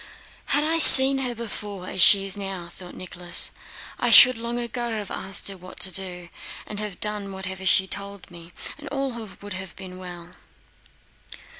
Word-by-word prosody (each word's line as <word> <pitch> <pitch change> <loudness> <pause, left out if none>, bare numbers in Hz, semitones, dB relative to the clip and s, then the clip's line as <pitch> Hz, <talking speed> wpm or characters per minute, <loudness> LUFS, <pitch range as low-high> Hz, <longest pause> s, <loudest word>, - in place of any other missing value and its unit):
"Had 290 +1 +1
I 325 +2 0
seen 270 -3 +7
her 250 -2 -4
before 205 -4 -7
as 185 - -2
she 195 +2 +7
is 195 0 -2
now," 195 -3 -6
thought 180 +1 -13
Nicholas, 175 -1 +1 0.5
"I - - 0
should 255 0 +8
long 235 +1 -6
ago 240 0 -5
have 215 -3 -5
asked 195 +1 -2
her 195 - -1
what 185 0 -14
to 190 - +6
do 180 -2 -4 0.4
and 210 - -8
have 210 -4 -5
done 210 -2 -4
whatever 190 0 -6
she 190 - +4
told 200 -1 -8
me, 170 0 -13 0.3
and 295 - -11
all 275 -1 -3 0.3
would 205 -1 -8
have 185 -2 -9
been 185 -1 -11
well." 175 -1 -11
195 Hz, 175 wpm, -23 LUFS, 185-230 Hz, 0.5 s, should